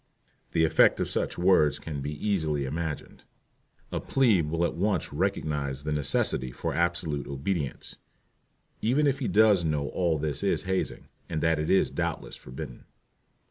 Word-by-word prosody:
The 80 Hz, -, +4 dB
effect 80 Hz, -, +4 dB
of -, -, 0 dB
such -, -, -2 dB
words 85 Hz, -5 st, +4 dB
can 75 Hz, -3 st, -6 dB
be 75 Hz, +2 st, -4 dB
easily 80 Hz, -8 st, 0 dB
imagined. 80 Hz, +2 st, -5 dB, 0.7 s
A -, -, -1 dB
"plebe" 105 Hz, -, +2 dB
will 85 Hz, +2 st, +1 dB
at -, -, -1 dB
once 95 Hz, -1 st, -1 dB
recognize 70 Hz, -3 st, -1 dB
the 75 Hz, -, -2 dB
necessity 70 Hz, -3 st, 0 dB
for -, -, -3 dB
absolute 85 Hz, -3 st, 0 dB
obedience, 70 Hz, +2 st, -3 dB, 0.8 s
even 135 Hz, +7 st, +2 dB
if 140 Hz, -1 st, +1 dB
he 130 Hz, -, -1 dB
does 105 Hz, -4 st, +5 dB
know 75 Hz, -3 st, -1 dB
all 85 Hz, -1 st, 0 dB
this 75 Hz, -1 st, -2 dB
is 100 Hz, -, +1 dB
hazing, 95 Hz, 0 st, -2 dB, 0.2 s
and 80 Hz, -, -1 dB
that 80 Hz, -1 st, +2 dB
it 75 Hz, -, -2 dB
is 95 Hz, -, +3 dB
doubtless -, -, -3 dB
forbidden. 65 Hz, -1 st, -9 dB
80 Hz, 155 wpm, -28 LUFS, 75-95 Hz, 0.8 s, does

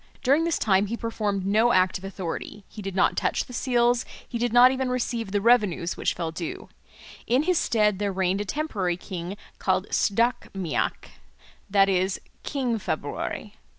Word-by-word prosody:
During 285 Hz, +6 st, +3 dB
this 335 Hz, -, +1 dB
time 200 Hz, -1 st, +2 dB
he 230 Hz, +3 st, -3 dB
performed 210 Hz, -4 st, -2 dB
no 220 Hz, +4 st, +3 dB
act 185 Hz, 0 st, +3 dB
of -, -, -18 dB
authority, 195 Hz, +1 st, -5 dB
he 210 Hz, -, -10 dB
did 195 Hz, -2 st, -5 dB
not 190 Hz, -, +3 dB
touch -, -, 0 dB
the 250 Hz, -, -12 dB
seals, 245 Hz, -1 st, +2 dB, 0.2 s
he 235 Hz, -, -4 dB
did 240 Hz, 0 st, 0 dB
not 245 Hz, +2 st, +7 dB
even 260 Hz, -1 st, -1 dB
receive 235 Hz, -4 st, -2 dB
the 205 Hz, 0 st, +1 dB
revenues 210 Hz, -7 st, +3 dB
which -, -, -1 dB
fell 165 Hz, -2 st, -3 dB
due. 165 Hz, 0 st, -6 dB, 0.6 s
In 255 Hz, +5 st, +3 dB
his 360 Hz, 0 st, +2 dB
stead 210 Hz, -3 st, +2 dB
there 205 Hz, -1 st, 0 dB
reigned 190 Hz, +1 st, 0 dB
a -, -, -3 dB
temporary 200 Hz, -, -2 dB
king 180 Hz, +1 st, -6 dB, 0.2 s
called 185 Hz, 0 st, +1 dB
Sdach 230 Hz, +4 st, +1 dB
Méac, 180 Hz, -6 st, -2 dB, 0.6 s
that 195 Hz, 0 st, +5 dB
is, 190 Hz, 0 st, +1 dB, 0.2 s
King 250 Hz, -6 st, -1 dB
February. 200 Hz, +6 st, -4 dB
205 Hz, 175 wpm, -25 LUFS, 190-240 Hz, 0.6 s, not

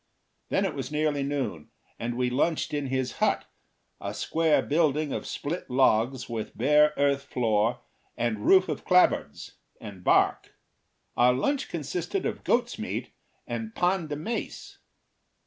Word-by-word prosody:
Then 195 Hz, -, +1 dB
it 185 Hz, -, -2 dB
was 135 Hz, -1 st, -5 dB
nearly 150 Hz, -1 st, 0 dB
noon, 135 Hz, -, -3 dB, 0.3 s
and 120 Hz, +1 st, -3 dB
we 125 Hz, -1 st, 0 dB
lunched 155 Hz, +3 st, 0 dB
in 145 Hz, -2 st, -1 dB
his 130 Hz, -1 st, -1 dB
hut, -, -, +1 dB, 0.5 s
a -, -, -5 dB
square 160 Hz, -2 st, +2 dB
building 150 Hz, -1 st, +1 dB
of -, -, -4 dB
split 165 Hz, +5 st, -4 dB
logs, 125 Hz, -1 st, +2 dB
with 115 Hz, -2 st, -5 dB
bare 150 Hz, +5 st, +5 dB
earth 140 Hz, 0 st, +1 dB
floor, 115 Hz, -2 st, 0 dB, 0.4 s
and 115 Hz, -3 st, -1 dB
roof 190 Hz, +5 st, +5 dB
of -, -, -4 dB
clap 180 Hz, 0 st, +6 dB
boards -, -, -7 dB, 0.2 s
and 100 Hz, -4 st, -10 dB
bark. -, -, +2 dB, 0.6 s
Our 125 Hz, +1 st, +5 dB
lunch 270 Hz, -, -1 dB
consisted 175 Hz, -, -3 dB
of -, -, -3 dB
goat's -, -, 0 dB
meat -, -, -4 dB, 0.3 s
and 225 Hz, 0 st, -5 dB
pan 180 Hz, -2 st, +1 dB
de 150 Hz, -, -3 dB
mais. 220 Hz, +11 st, -5 dB
140 Hz, 145 wpm, -27 LUFS, 125-160 Hz, 0.6 s, clap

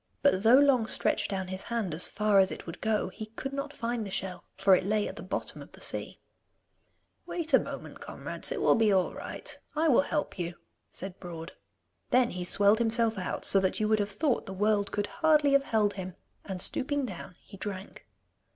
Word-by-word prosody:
But 280 Hz, -10 st, +4 dB
though 230 Hz, +4 st, +7 dB
Long 270 Hz, -5 st, +4 dB
stretched -, -, +1 dB
down 190 Hz, -2 st, -3 dB
his 190 Hz, 0 st, -3 dB
hand 225 Hz, -8 st, -2 dB
as 160 Hz, -, 0 dB
far 210 Hz, -1 st, +3 dB
as 190 Hz, 0 st, +5 dB
it -, -, -7 dB
would 165 Hz, 0 st, -8 dB
go, 215 Hz, -3 st, 0 dB
he 215 Hz, +3 st, -8 dB
could 265 Hz, +5 st, -6 dB
not 280 Hz, +1 st, -3 dB
find 235 Hz, -4 st, -3 dB
the 200 Hz, -, -6 dB
shell, 190 Hz, -1 st, -4 dB
for 195 Hz, 0 st, +6 dB
it 185 Hz, -, 0 dB
lay 210 Hz, +2 st, +1 dB
at -, -, -7 dB
the -, -, -8 dB
bottom -, -, -4 dB
of -, -, -13 dB
the -, -, -13 dB
sea. -, -, -4 dB, 1.1 s
'Wait 330 Hz, -2 st, -3 dB
a -, -, +8 dB
moment, -, -, -7 dB
comrades, -, -, -3 dB
it -, -, -2 dB
will -, -, +5 dB
be 225 Hz, -2 st, +3 dB
all 190 Hz, -2 st, +2 dB
right. -, -, -6 dB, 0.2 s
I 320 Hz, +1 st, +2 dB
will 260 Hz, -, +6 dB
help 295 Hz, -6 st, -3 dB
you,' 175 Hz, 0 st, -3 dB, 0.3 s
said 190 Hz, 0 st, -8 dB
Broad. 170 Hz, -1 st, -7 dB, 0.6 s
Then 250 Hz, -1 st, +3 dB
he 180 Hz, 0 st, -4 dB
swelled 200 Hz, +4 st, +4 dB
himself 225 Hz, -2 st, +2 dB
out 185 Hz, -, -4 dB
so 195 Hz, -, +5 dB
that 190 Hz, -1 st, 0 dB
you 215 Hz, -, +1 dB
would 215 Hz, 0 st, +3 dB
have 205 Hz, 0 st, 0 dB
thought 235 Hz, +6 st, 0 dB
the 195 Hz, -, -5 dB
world 205 Hz, +1 st, +1 dB
could 205 Hz, 0 st, -1 dB
hardly 305 Hz, 0 st, +3 dB
have 275 Hz, 0 st, +4 dB
held 210 Hz, -2 st, +2 dB
him, 185 Hz, -2 st, -6 dB, 0.3 s
and 190 Hz, -2 st, -5 dB
stooping 280 Hz, +8 st, 0 dB
down 180 Hz, -4 st, -8 dB
he 205 Hz, -, -14 dB
drank. 195 Hz, 0 st, -7 dB
210 Hz, 215 wpm, -29 LUFS, 190-240 Hz, 1.1 s, a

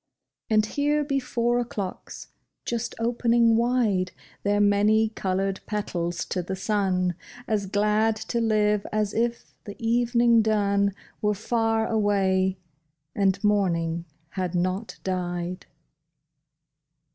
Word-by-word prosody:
And 215 Hz, -1 st, +4 dB
here 290 Hz, +5 st, 0 dB
be 275 Hz, -1 st, 0 dB
four 240 Hz, -1 st, 0 dB
o'clocks, 205 Hz, -6 st, -5 dB, 0.4 s
just 235 Hz, 0 st, -3 dB
opening 235 Hz, 0 st, +3 dB
wide 225 Hz, -6 st, +1 dB, 0.3 s
Their 205 Hz, 0 st, +1 dB
many 205 Hz, +2 st, +3 dB
colored 195 Hz, -2 st, -2 dB
petals 175 Hz, -5 st, -2 dB
to 185 Hz, -, -2 dB
the 180 Hz, +2 st, -4 dB
sun, 190 Hz, -3 st, 0 dB, 0.3 s
As 205 Hz, -3 st, 0 dB
glad 210 Hz, +2 st, +2 dB
to 235 Hz, +2 st, -3 dB
live 210 Hz, -2 st, +2 dB
as 210 Hz, -1 st, 0 dB
if 235 Hz, +1 st, -2 dB
the 205 Hz, -, -7 dB
evening 235 Hz, 0 st, +3 dB
dun 200 Hz, -2 st, +1 dB, 0.3 s
Were 210 Hz, 0 st, +1 dB
far 225 Hz, +1 st, 0 dB
away, 195 Hz, -3 st, +1 dB, 0.6 s
and 195 Hz, -1 st, +2 dB
morning 170 Hz, -5 st, +1 dB, 0.2 s
had 185 Hz, -1 st, -3 dB
not 185 Hz, +5 st, -2 dB
died 180 Hz, -1 st, -3 dB
210 Hz, 110 wpm, -25 LUFS, 190-230 Hz, 0.6 s, And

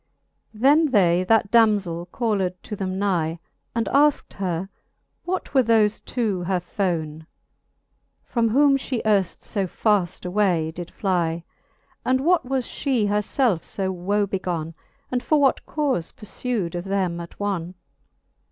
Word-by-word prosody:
XVI. -, -, -13 dB
Then 295 Hz, +5 st, +5 dB
they 180 Hz, -6 st, +3 dB
that 220 Hz, 0 st, +3 dB
damzell 200 Hz, -7 st, +3 dB
called 205 Hz, -6 st, 0 dB
to 210 Hz, -, -6 dB
then 190 Hz, -1 st, -3 dB
nie, 175 Hz, -5 st, 0 dB, 0.4 s
And 230 Hz, -1 st, +1 dB
aiked 290 Hz, +2 st, +2 dB
her, 185 Hz, -2 st, -2 dB, 0.6 s
what 370 Hz, -3 st, -3 dB
were 265 Hz, -, +6 dB
thofe 220 Hz, -3 st, +2 dB
two 215 Hz, -7 st, -1 dB
her 185 Hz, 0 st, +1 dB
fone, 165 Hz, -4 st, -3 dB, 1.0 s
From 230 Hz, -2 st, +1 dB
whom 275 Hz, +4 st, +4 dB
fhe 255 Hz, -3 st, -3 dB
earft 200 Hz, -4 st, +1 dB
{o 195 Hz, -2 st, +1 dB
faft 195 Hz, -3 st, 0 dB
away 180 Hz, -4 st, +1 dB
did 170 Hz, +1 st, -7 dB
fiie 170 Hz, -4 st, -1 dB, 0.3 s
\ -, -, -39 dB
And 260 Hz, +1 st, +2 dB
what 340 Hz, +2 st, +3 dB
was 260 Hz, -2 st, -1 dB
fhe 245 Hz, -8 st, 0 dB
her 210 Hz, +1 st, +2 dB
felfe 215 Hz, -, +1 dB
fe 190 Hz, -1 st, -1 dB
woe 195 Hz, +3 st, 0 dB
begone, 175 Hz, -4 st, -3 dB, 0.4 s
And 250 Hz, -1 st, 0 dB
for 305 Hz, +3 st, +2 dB
what 275 Hz, -2 st, +2 dB
caufe 275 Hz, -, -1 dB
purfu'd 210 Hz, -4 st, -3 dB
of 175 Hz, +1 st, -4 dB
them 190 Hz, -3 st, -1 dB
attone. 180 Hz, 0 st, -4 dB
200 Hz, 145 wpm, -23 LUFS, 175-235 Hz, 1.0 s, were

